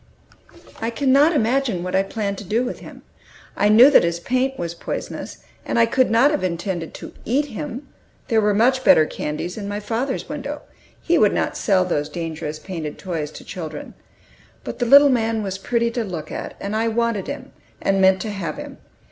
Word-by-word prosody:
I 225 Hz, -, -1 dB
cannot 275 Hz, +5 st, +4 dB
imagine 245 Hz, -, +1 dB
what 180 Hz, +1 st, -3 dB
I 190 Hz, -, +3 dB
meant 200 Hz, -3 st, -2 dB
to -, -, -7 dB
do 220 Hz, +5 st, 0 dB
with 250 Hz, -, -5 dB
him. -, -, -12 dB, 0.5 s
I 205 Hz, -, +2 dB
knew 240 Hz, +7 st, +8 dB
that -, -, +6 dB
his 170 Hz, 0 st, -1 dB
paint 255 Hz, +7 st, -1 dB
was 170 Hz, -1 st, -4 dB
poisonous, 170 Hz, -, -6 dB, 0.2 s
and -, -, -2 dB
I 230 Hz, -, +6 dB
could 255 Hz, +2 st, +2 dB
not 235 Hz, +6 st, +4 dB
have 300 Hz, -, -1 dB
intended 175 Hz, -1 st, -3 dB
to -, -, -9 dB
eat 270 Hz, +6 st, +1 dB
him; 220 Hz, -, -6 dB, 0.4 s
there 225 Hz, -4 st, +3 dB
were 210 Hz, -1 st, +2 dB
much 255 Hz, +4 st, +3 dB
better 160 Hz, -10 st, +6 dB
candies 155 Hz, +5 st, -4 dB
in 205 Hz, -2 st, -5 dB
my 205 Hz, 0 st, -3 dB
father's 235 Hz, +6 st, -3 dB
window; 290 Hz, +1 st, -5 dB, 0.4 s
he 340 Hz, -1 st, +3 dB
would 210 Hz, -, +4 dB
not -, -, -1 dB
sell 185 Hz, -2 st, +2 dB
these 150 Hz, -4 st, -1 dB
dangerous 155 Hz, -2 st, -5 dB
painted 160 Hz, -4 st, -6 dB
toys 165 Hz, -6 st, -4 dB
to -, -, -11 dB
children. 155 Hz, -4 st, -7 dB, 0.7 s
But -, -, -7 dB
the 245 Hz, -, 0 dB
little 280 Hz, +3 st, +8 dB
man 225 Hz, -3 st, 0 dB
was 190 Hz, -1 st, -4 dB
pretty 235 Hz, +2 st, 0 dB
to 235 Hz, 0 st, -2 dB
look 170 Hz, -7 st, -6 dB
at, -, -, -6 dB
and 200 Hz, +2 st, -4 dB
I 225 Hz, +1 st, +1 dB
wanted 230 Hz, -3 st, 0 dB
him, -, -, -7 dB, 0.3 s
and 195 Hz, 0 st, +1 dB
meant 190 Hz, 0 st, +4 dB
to 215 Hz, -, -3 dB
have 170 Hz, -7 st, -4 dB
him. -, -, -9 dB
210 Hz, 200 wpm, -21 LUFS, 180-245 Hz, 0.7 s, knew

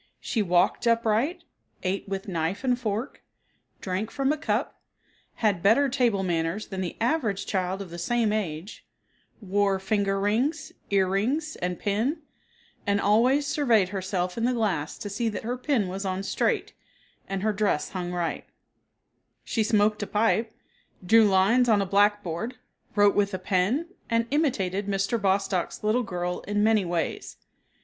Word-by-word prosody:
She 225 Hz, -, -1 dB
walked 180 Hz, +4 st, +2 dB
upright, 230 Hz, -, +1 dB, 0.4 s
ate 195 Hz, +1 st, -2 dB
with 195 Hz, +2 st, -4 dB
knife 170 Hz, +3 st, -2 dB
and 250 Hz, -1 st, +1 dB
fork, 225 Hz, +2 st, -3 dB, 0.6 s
drank 190 Hz, +3 st, -2 dB
from 275 Hz, +3 st, 0 dB
a -, -, -3 dB
cup, 320 Hz, -, -2 dB, 0.5 s
had 205 Hz, -6 st, +1 dB
better 235 Hz, +9 st, +4 dB
table 240 Hz, -7 st, +1 dB
manners 170 Hz, +3 st, -1 dB
than 190 Hz, -1 st, -4 dB
the 180 Hz, -, -4 dB
average 225 Hz, -6 st, 0 dB
child 190 Hz, 0 st, -2 dB
of 180 Hz, -, -13 dB
the 170 Hz, -, -7 dB
same 225 Hz, +3 st, +1 dB
age, 185 Hz, -2 st, -4 dB, 0.6 s
wore 200 Hz, 0 st, +1 dB
finger 195 Hz, 0 st, 0 dB
rings, 225 Hz, +10 st, 0 dB, 0.2 s
ear 195 Hz, -2 st, +3 dB
rings, 265 Hz, +12 st, -1 dB
and 180 Hz, 0 st, -2 dB
pin, 235 Hz, -, -1 dB, 0.6 s
and 200 Hz, 0 st, +2 dB
always 245 Hz, +8 st, +3 dB
surveyed 245 Hz, -10 st, +2 dB
herself 185 Hz, 0 st, -2 dB
in 230 Hz, -, +1 dB
the 250 Hz, -, +2 dB
glass 190 Hz, -10 st, -1 dB
to -, -, -6 dB
see 225 Hz, +3 st, -1 dB
that 210 Hz, -, -5 dB
her 240 Hz, +3 st, -2 dB
pin 255 Hz, -5 st, 0 dB
was 190 Hz, +2 st, -4 dB
on 190 Hz, 0 st, -2 dB
straight, -, -, -1 dB, 0.6 s
and 195 Hz, 0 st, -3 dB
her 215 Hz, 0 st, +1 dB
dress 200 Hz, -7 st, 0 dB
hung 180 Hz, -2 st, -4 dB
right; 175 Hz, -2 st, -2 dB, 1.0 s
she 225 Hz, -, -1 dB
smoked 215 Hz, -1 st, +2 dB
a 205 Hz, -, -3 dB
pipe, 220 Hz, +1 st, +1 dB, 0.5 s
drew 225 Hz, +4 st, +6 dB
lines 205 Hz, +6 st, +4 dB
on 215 Hz, -2 st, +5 dB
a 200 Hz, -, +1 dB
blackboard, 205 Hz, +2 st, +1 dB, 0.4 s
wrote 205 Hz, -1 st, +5 dB
with 200 Hz, -1 st, +1 dB
a -, -, -1 dB
pen, 190 Hz, -, 0 dB, 0.2 s
and 230 Hz, 0 st, +2 dB
imitated 205 Hz, -, 0 dB
Mr. 200 Hz, +3 st, 0 dB
Bostock's 195 Hz, -2 st, 0 dB
little 215 Hz, +4 st, +2 dB
girl 180 Hz, -5 st, -3 dB
in 205 Hz, 0 st, +1 dB
many 220 Hz, -2 st, +4 dB
ways. 170 Hz, -1 st, -3 dB
205 Hz, 155 wpm, -26 LUFS, 190-230 Hz, 1.0 s, drew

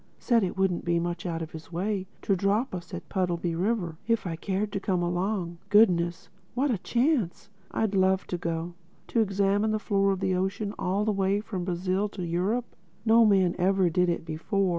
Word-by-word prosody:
Said 235 Hz, -4 st, +2 dB
it 185 Hz, -, -2 dB
wouldn't 190 Hz, -2 st, +1 dB
be 170 Hz, -1 st, +1 dB
much 175 Hz, +1 st, -3 dB
out 165 Hz, -1 st, -2 dB
of 160 Hz, -, -8 dB
his 160 Hz, +1 st, -10 dB
way 190 Hz, +2 st, -2 dB, 0.2 s
to 195 Hz, -, +2 dB
drop 200 Hz, +7 st, +1 dB
us 175 Hz, 0 st, -6 dB
at 180 Hz, -1 st, -7 dB
Puddleby 175 Hz, -2 st, -1 dB
River, 175 Hz, -3 st, -1 dB
if 230 Hz, -3 st, +1 dB
we 170 Hz, -2 st, -2 dB
cared 200 Hz, +5 st, -2 dB
to 195 Hz, -, -2 dB
come 185 Hz, -3 st, 0 dB
along—Goodness, 175 Hz, 0 st, +1 dB, 0.3 s
what 270 Hz, +2 st, +2 dB
a 215 Hz, -, 0 dB
chance! 235 Hz, -, 0 dB, 0.2 s
I'd 220 Hz, -2 st, -1 dB
love 190 Hz, 0 st, +3 dB
to 180 Hz, -, -3 dB
go. 165 Hz, 0 st, -3 dB, 0.4 s
To 235 Hz, -, +1 dB
examine 200 Hz, +1 st, +2 dB
the 215 Hz, -, +1 dB
floor 200 Hz, -1 st, +1 dB
of 190 Hz, -, -1 dB
the 190 Hz, -1 st, 0 dB
ocean 195 Hz, +3 st, -1 dB
all 195 Hz, +3 st, 0 dB
the 215 Hz, -, +2 dB
way 195 Hz, 0 st, +1 dB
from 195 Hz, -4 st, -4 dB
Brazil 185 Hz, +3 st, 0 dB
to 180 Hz, -, -3 dB
Europe! 190 Hz, +8 st, 0 dB, 0.4 s
No 225 Hz, 0 st, +6 dB
man 190 Hz, -4 st, +4 dB
ever 185 Hz, -1 st, +3 dB
did 180 Hz, +1 st, +2 dB
it 170 Hz, -1 st, -2 dB
before. 185 Hz, +5 st, 0 dB
190 Hz, 195 wpm, -27 LUFS, 175-205 Hz, 0.4 s, No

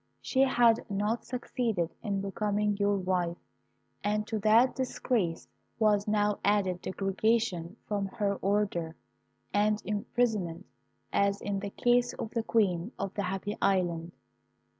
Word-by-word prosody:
She 260 Hz, -, -2 dB
had 240 Hz, -4 st, +4 dB
not 210 Hz, +3 st, -1 dB
succeeded 235 Hz, -8 st, -2 dB
in 200 Hz, -3 st, -2 dB
becoming 205 Hz, +1 st, 0 dB
your 205 Hz, 0 st, +2 dB
wife, 180 Hz, -2 st, -1 dB, 0.7 s
and 210 Hz, +1 st, 0 dB
to 220 Hz, 0 st, -2 dB
that 225 Hz, +5 st, +5 dB
disgrace 240 Hz, -9 st, -1 dB, 0.3 s
was 210 Hz, -2 st, +3 dB
now 210 Hz, -1 st, +1 dB
added 195 Hz, -3 st, +2 dB
degradation 195 Hz, -2 st, 0 dB
from 200 Hz, -2 st, -1 dB
her 200 Hz, -1 st, -1 dB
order, 195 Hz, -5 st, 0 dB, 0.6 s
and 210 Hz, +1 st, +2 dB
imprisonment, 205 Hz, -3 st, -1 dB, 0.5 s
as 200 Hz, 0 st, +2 dB
in 200 Hz, -1 st, -2 dB
the 200 Hz, 0 st, -4 dB
case 245 Hz, +3 st, +2 dB
of 220 Hz, -, -5 dB
the 230 Hz, -, 0 dB
Queen 200 Hz, -3 st, +1 dB
of 195 Hz, -1 st, -3 dB
the 205 Hz, -, -2 dB
Happy 195 Hz, +2 st, -3 dB
Island. 175 Hz, -3 st, +1 dB
205 Hz, 130 wpm, -30 LUFS, 190-220 Hz, 0.7 s, that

